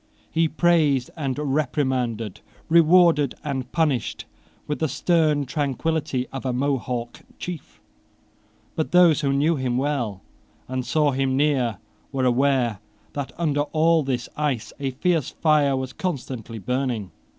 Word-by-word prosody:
He 165 0 +2
praised 155 -6 +2
and 140 -5 -2
reprimanded, 130 -7 -1 0.3
rewarded 165 -3 +5
and 130 -4 -4
punished, 150 -7 0 0.4
with 150 - -3
the 160 - +1
stern 150 0 +2
tranquillity 145 0 -1
of 135 - -5
a 130 - -1
Mohawk 125 -2 -2 0.2
chief: 175 -4 -7 1.0
but 160 - -2
those 175 -4 +6
who 140 -2 +1
knew 150 +4 +2
him 125 -2 -1
well 125 -8 -2 0.4
and 130 0 -2
saw 145 +4 +2
him 135 0 0
near 135 -6 +1 0.3
were 135 -1 0
aware 125 -4 +2 0.3
that 140 -2 -4
under 150 -4 +1
all 160 +2 +2
this 130 -4 -2
ice 135 -8 -2
a 140 -1 -1
fierce 160 +2 0
fire 150 -3 +2
was 130 -1 -4
constantly 130 - -4
burning. 120 -3 -2
140 Hz, 130 wpm, -24 LUFS, 125-155 Hz, 1.0 s, those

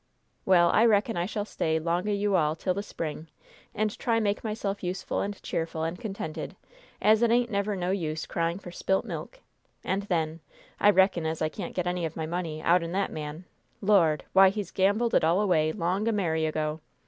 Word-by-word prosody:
Well, 175 -2 +5
I 230 +2 +5
reckon 210 +1 +2
I 175 +1 -1
shall 205 0 -3
stay 160 -6 -1
'long 170 +5 -1
o' - - +1
you 205 -1 +1
all 155 -3 +2
till 180 +3 -1
the 200 - -3
spring, 160 -5 -6 0.5
and 215 -1 0
try 230 -1 +1
make 205 -2 -1
myself 210 -2 -3
useful 185 +1 -2
and 200 0 -4
cheerful 160 -1 -3
and 165 +2 -3
contented, 195 -7 -5 0.4
as 215 +1 +4
it 235 - +4
ain't 240 +1 +2
never 200 0 0
no 180 -1 -1
use 160 -5 -2
crying 170 +1 -1
for 185 -3 -10
spilt 190 +2 0
milk; - - -7 0.4
and, 195 +1 -1
then, 160 -2 0 0.4
I 205 - +6
reckon 190 -4 +3
as 160 0 -3
I 155 - 0
can't 175 +2 -7
get 180 - -1
any 180 0 -1
of 160 -1 -3
my 160 - -3
money 160 -2 -4
out'n 170 0 +2
that 195 +1 0
man 155 +2 -6 0.3
Lord! 175 -8 +3
why, 190 0 +8
he's 205 0 -4
gambled 205 +5 +2
it - - +4
all 165 +4 +3
away 165 -7 +2
long 185 +4 -1
a - - +3
merry 160 -6 0
ago! 155 0 -2
180 Hz, 205 wpm, -27 LUFS, 160-205 Hz, 0.5 s, why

